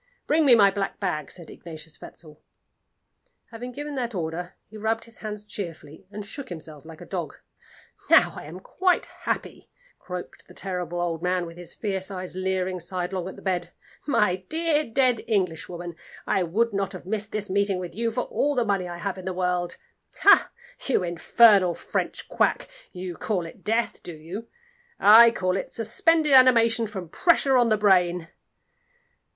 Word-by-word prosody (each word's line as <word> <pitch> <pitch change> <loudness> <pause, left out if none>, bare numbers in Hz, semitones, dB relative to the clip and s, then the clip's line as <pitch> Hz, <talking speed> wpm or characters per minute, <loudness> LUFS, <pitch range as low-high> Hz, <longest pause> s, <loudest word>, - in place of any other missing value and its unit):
"Bring 310 -1 +3
me 245 - +8
my 200 -3 +6
black 195 0 -3
bag," 155 -7 -2
said 170 -3 -11
Ignatius 160 -2 -11
Wetzel. 155 -2 -12 1.1
Having 245 +2 -7
given 290 +2 -6
that 245 -4 -3
order, 175 +1 -4
he 220 - -16
rubbed 220 +1 -1
his 230 -1 -12
hands 210 -1 -6
cheerfully, 165 -5 -8
and 210 0 -7
shook 275 +6 -8
himself 160 -3 -8
like 160 0 -12
a - - -9
dog. 170 -4 -5 0.7
"Now - - +6
I - - -8
am 170 +5 -9
quite 365 - +1
happy," - - -5 0.3
croaked 180 -1 -8
the - - -16
terrible 180 -3 -4
old 170 -2 -2
man, 180 0 0
with 165 0 -10
his 175 0 -11
fierce 195 -3 -3
eyes 185 -2 -6
leering 185 -1 -1
sidelong 180 +1 -3
at 190 - -7
the - - -14
bed. 180 -3 -2 0.3
"My 210 -9 +2
dear, 320 -1 +1
dead 250 -1 +2
Englishwoman, 175 -4 -2 0.3
I 195 - +1
would 210 +7 0
not 195 0 -1
have 185 - -9
missed 215 +2 -3
this 210 -1 -2
meeting 200 0 +1
with 180 -1 -6
you 230 +2 -1
for 230 +2 -2
all 290 +3 -1
the 245 -2 +1
money 195 -3 0
I 175 - -6
have 190 +2 -4
in 185 - -9
the 190 - -2
world. 180 -1 -1 0.4
Ha! - - +7 0.4
you 255 -8 +2
infernal 180 +1 +4
French - - -3
Quack, - - +1 0.2
you 180 0 -6
call 185 -1 -2
it 165 - -12
death, 225 +2 0
do 170 - -8
you? 175 +9 -8 0.5
I 230 +3 +9
call 185 -5 -1
it 195 - -3
suspended 310 - +2
animation 235 -3 +6
from 190 -4 -7
pressure 280 - +3
on 240 -2 +4
the 215 - +3
brain!" 180 -4 +3
190 Hz, 175 wpm, -25 LUFS, 175-225 Hz, 1.1 s, I